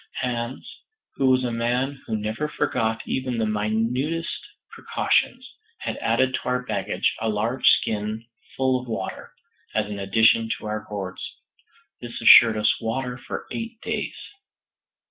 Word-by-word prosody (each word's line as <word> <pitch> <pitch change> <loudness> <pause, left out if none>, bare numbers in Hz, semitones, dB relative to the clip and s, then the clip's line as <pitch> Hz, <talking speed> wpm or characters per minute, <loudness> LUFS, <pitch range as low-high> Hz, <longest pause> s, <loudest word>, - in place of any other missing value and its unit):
Hans, 120 0 -3 0.5
who 135 - +1
was 130 0 +4
a 120 - -1
man 125 +4 -1
who 110 - -1
never 110 +8 -2
forgot 115 -7 -1
even 130 -2 -2
the 110 - +1
minutest 115 +10 -1 0.4
precautions, 250 +1 0 0.3
had - - -4
added 130 0 +1
to - - 0
our 125 0 0
baggage - - -1
a 110 - -1
large 110 +5 0
skin 110 +1 +1 0.3
full 130 -1 +2
of 125 - -12
water, 95 -5 -5 0.4
as 110 - +2
an 105 -1 -6
addition 110 +3 +4
to - - -11
our 105 0 -3
gourds. 95 -3 -5 0.8
This - - -6
assured 115 -2 +8
us 105 0 +2
water 125 +2 -2
for 125 - -6
eight 230 0 -5
days. - - -3
115 Hz, 145 wpm, -24 LUFS, 110-130 Hz, 0.8 s, assured